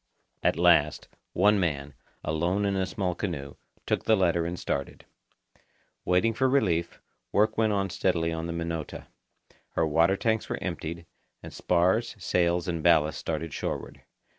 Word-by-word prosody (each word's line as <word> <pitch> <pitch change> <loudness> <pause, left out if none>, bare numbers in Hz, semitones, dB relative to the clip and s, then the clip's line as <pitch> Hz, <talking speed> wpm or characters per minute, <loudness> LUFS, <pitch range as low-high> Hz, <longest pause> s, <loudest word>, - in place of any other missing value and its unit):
At - - +2
last, - - +3 0.3
one 105 +3 +4
man, 70 -5 -2 0.3
alone 85 +6 0
in 100 -1 0
a 95 -1 0
small 90 -1 -2
canoe, 85 -7 -4 0.3
took - - 0
the 110 - +4
letter 85 -3 +2
and 90 +1 -4
started. 70 -4 -4 1.0
Waiting 90 +6 +2
for 130 +3 +1
relief, 90 -11 +1 0.3
work 110 +2 +2
went 110 -1 +2
on 100 -2 0
steadily 85 -3 0
on 80 0 -4
the - - -3
Minota. 85 -2 -5 0.6
Her - - +1
water 85 +5 +3
tanks 110 0 0
were - - -2
emptied, 85 +2 -5 0.4
and - - -9
spars, 90 +7 +1
sails, 85 -1 +1
and 85 -2 -2
ballast 80 -2 +3
started 80 -1 -4
shoreward. - - -5
85 Hz, 150 wpm, -27 LUFS, 80-100 Hz, 1.0 s, one